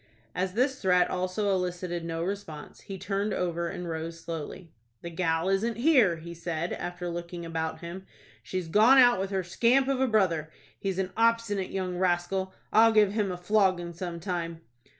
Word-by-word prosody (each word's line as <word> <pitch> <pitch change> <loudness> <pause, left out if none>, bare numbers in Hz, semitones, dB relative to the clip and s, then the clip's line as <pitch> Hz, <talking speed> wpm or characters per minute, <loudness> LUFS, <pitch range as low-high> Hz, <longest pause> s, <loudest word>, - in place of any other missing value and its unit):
As 185 0 -2
this 255 +4 0
threat 180 -2 +3
also 185 +3 -1
elicited 180 -2 -2
no 165 0 -3
response, 185 -5 -6
he 195 - -7
turned 200 +2 -2
over 170 -1 -1
and 180 - -6
rose 165 0 -5
slowly. 165 +1 -7 0.3
"The 170 - -6
gal 165 0 0
isn't 215 +4 0
here," 240 - +4
he 170 +1 -9
said, 170 0 -3
after 175 0 -5
looking 170 0 -5
about 160 -1 -3
him. 180 +3 -8 0.3
"She's 185 -2 -4
gone 220 +10 +6
out 245 -4 +6
with 195 0 -2
her 190 -1 -1
scamp 240 +9 +2
of 270 -1 0
a 265 - +3
brother. 180 -9 +1 0.3
He's 195 -2 -2
an 190 -1 -1
obstinate 230 -4 +1
young 185 -2 -3
rascal. 185 +1 0 0.2
I'll 225 +1 +7
give 210 -2 +4
him 205 -2 0
a 180 - -4
flogging 185 -2 +1
some 170 0 -5
time." 170 -2 -4
185 Hz, 175 wpm, -28 LUFS, 170-205 Hz, 0.3 s, I'll